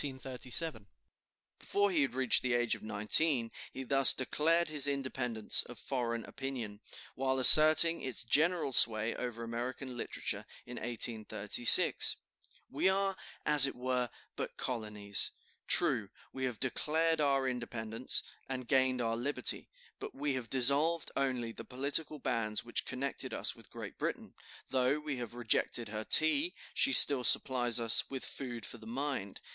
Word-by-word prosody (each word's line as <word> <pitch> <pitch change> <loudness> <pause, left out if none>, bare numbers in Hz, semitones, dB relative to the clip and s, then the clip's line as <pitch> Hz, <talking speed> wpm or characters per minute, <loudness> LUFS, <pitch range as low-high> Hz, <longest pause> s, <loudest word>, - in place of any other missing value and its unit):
Before 200 0 -1
he 165 -5 0
had 135 -2 -2
reached 130 -2 +3
the 125 -1 -2
age 120 -1 -1
of - - -8
nineteen 115 +4 +1 0.2
he 135 - -8
thus 135 0 +6
declared 165 +6 -1
his 150 -2 +1
independence 130 -5 0
of 120 - -13
foreign 115 -3 -5
opinion, 120 -7 -8 0.3
while 130 0 -2
asserting 155 +5 +8
its 130 -2 -4
general 155 +3 0
sway 110 -1 +5
over 120 -2 -7
American 125 +3 -7
literature, 120 - -4 0.2
in 125 0 -10
1836: 110 -1 +3 0.6
"We 190 - 0
are, 195 0 -1 0.3
as 150 -2 +7
it - - -7
were, 125 -1 -3 0.3
but - - -7
colonies. 105 -4 -2 0.4
True, - - +1 0.2
we 130 0 -5
have 125 -4 -6
declared 160 +4 -2
our 135 -2 0
independence, 120 -2 -2 0.3
and 130 -2 -6
gained 130 -1 0
our 115 -1 -2
liberty, 140 +5 -2 0.3
but - - -9
we 145 0 -3
have 125 -4 -6
dissolved 140 +6 +1
only 130 -4 -3
the - - -11
political 140 +4 -3
bands 115 -5 -3
which 120 - -4
connected 135 +2 -4
us - - -3
with - - -16
Great - - -11
Britain; - - -6 0.3
though 130 +2 -1
we 150 -3 -6
have 120 -1 -8
rejected 120 -1 -1
her 110 0 -6
tea, 280 - +3 0.2
she 275 - +1
still 140 - +6
supplies 120 -2 +3
us 115 -1 +1
with 135 -1 -7
food 120 -6 -7
for 120 - -9
the 110 - -14
mind. 125 -5 -5
130 Hz, 145 wpm, -31 LUFS, 115-140 Hz, 0.6 s, asserting